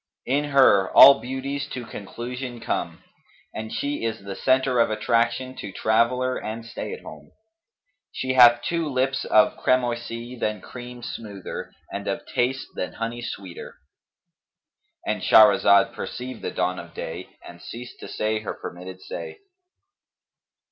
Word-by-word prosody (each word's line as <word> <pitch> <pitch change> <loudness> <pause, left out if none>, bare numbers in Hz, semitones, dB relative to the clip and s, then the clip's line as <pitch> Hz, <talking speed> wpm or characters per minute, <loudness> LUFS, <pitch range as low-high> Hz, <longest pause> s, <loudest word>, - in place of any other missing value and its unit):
In 145 +3 +1
her 130 -9 +5
all 140 0 +11
beauties 135 +2 -4
to 125 -2 -5
conclusion 120 +4 -7
come, - - -3 0.5
and 110 0 -6
she 140 +5 -2
is 115 -1 -2
the 100 -1 -6
centre 130 +1 +2
of 115 - +4
attraction 115 +4 0
to 100 - -6
traveller 120 +5 +1
and 115 +1 -6
stay 115 - -6
at 460 - -8
home. - - -11 0.8
She 130 0 -2
hath 120 -1 +7
two 165 -2 -1
lips 135 0 0
of 105 - +4
cramoisy, 120 -1 -1
than 105 -1 -1
cream 125 +3 -10
smoother 105 -4 -7 0.2
and - - -5
of - - -3
taste 130 +2 -1
than 90 - -4
honey 115 +1 -4
sweeter,'" 95 -6 -7 1.3
—And - - -1
Shahrazad 100 -2 +6
perceived 125 -1 -6
the - - -3
dawn 90 0 -1
of 85 -1 -11
day 80 +3 -7
and 85 0 -12
ceased 120 +1 -9
to - - -8
say 110 0 -1
her 105 - -5
permitted 90 +1 -9
say. 440 -3 -7
120 Hz, 140 wpm, -24 LUFS, 110-130 Hz, 1.3 s, all